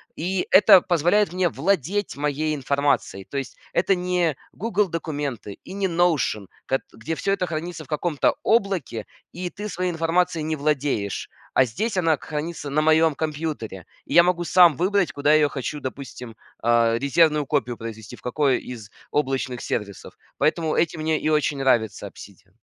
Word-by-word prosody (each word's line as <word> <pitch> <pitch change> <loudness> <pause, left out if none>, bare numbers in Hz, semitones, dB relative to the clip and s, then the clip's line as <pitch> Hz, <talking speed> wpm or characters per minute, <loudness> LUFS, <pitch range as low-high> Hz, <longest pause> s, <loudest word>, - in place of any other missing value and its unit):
И 180 +3 -2
это 195 -1 +8
позволяет 175 +5 +2
мне 180 -1 +1
владеть 190 +6 -1
моей 150 +1 -1
информацией, 140 -8 0
то 140 - -6
есть 135 -3 -5 0.2
это 190 +3 +3
не 180 -4 0 0.2
"Гугл 210 -1 0
Документы" 145 - -4
и 185 - -10
не 200 -1 -1
Notion, 165 - +1 0.2
кат 135 - 0
где 135 +9 -5
всё 195 +4 0
это 185 - -1
хранится 165 -1 -5
в - - -22
каком-то 150 0 0
облаке 195 - 0 0.3
и 180 0 -5
ты 210 +1 -6
своей 180 -1 -2
информацией 165 0 0
не 155 +1 -1
владеешь. 140 -9 -1 0.2
А 130 - +5
здесь 190 - -3
она 165 -4 +2
к - - -17
хранится 155 0 -4
на 155 - +2
моем 160 0 +4
компьютере, 150 - -4 0.2
и - - -6
я 170 - +9
могу 175 -1 +1
сам 175 -3 +6
выбрать, 190 +2 +1
куда 145 +1 -1
я 155 - +5
ее 145 - +3
хочу, 140 +2 -4
допустим, 130 -4 -7 0.3
а, 115 0 +3
резервную 150 +2 +3
копию 130 -5 -1
произвести, 110 -1 -8
в - - -19
какой 135 +1 +1
из 115 -5 -9 0.2
облачных 135 -3 -1
сервисов. 100 -3 -5 0.2
Поэтому 160 0 +1
этим 165 -1 0
мне 155 0 +1
и - - 0
очень 150 -2 +1
нравится 110 -6 +1
"Обсидиан". 95 -1 -14
155 Hz, 170 wpm, -23 LUFS, 130-175 Hz, 0.3 s, я